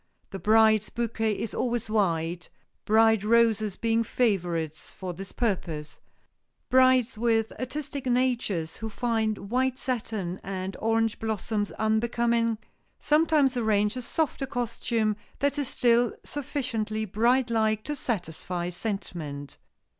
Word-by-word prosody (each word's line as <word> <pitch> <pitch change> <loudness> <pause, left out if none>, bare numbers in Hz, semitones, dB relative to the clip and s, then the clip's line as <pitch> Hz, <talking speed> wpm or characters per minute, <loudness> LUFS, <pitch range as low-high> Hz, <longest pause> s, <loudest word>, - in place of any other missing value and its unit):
The 195 - -5
bride's 220 +2 +4
bouquet 225 -2 -1
is 225 - -4
always 240 -2 -1
white, 175 -5 0 0.4
bride 220 -1 +4
roses 220 -2 +3
being 230 0 +1
favorites 175 -10 -1
for 185 -2 -6
this 195 +3 -8
purpose. 170 -9 -2 0.7
Brides 255 -2 +4
with 225 -2 +2
artistic 275 +1 -4
natures 240 -10 0
who 220 - -5
find 220 -3 -1
white 255 +1 +1
satin 215 -9 -3
and 190 -1 -4
orange 225 0 +1
blossoms 215 -1 -2
unbecoming, 230 +1 +1 0.4
sometimes 300 -3 +3
arrange 210 -2 +2
a 255 - -3
softer 275 +1 -1
costume 230 -3 -1 0.2
that 285 +1 0
is 285 - -1
still 240 -1 +2
sufficiently 240 -7 -3
bride 235 +5 +2
like 220 -1 +1
to 295 - -3
satisfy 180 - -3
sentiment. 165 - -5
225 Hz, 115 wpm, -27 LUFS, 200-245 Hz, 0.7 s, bride's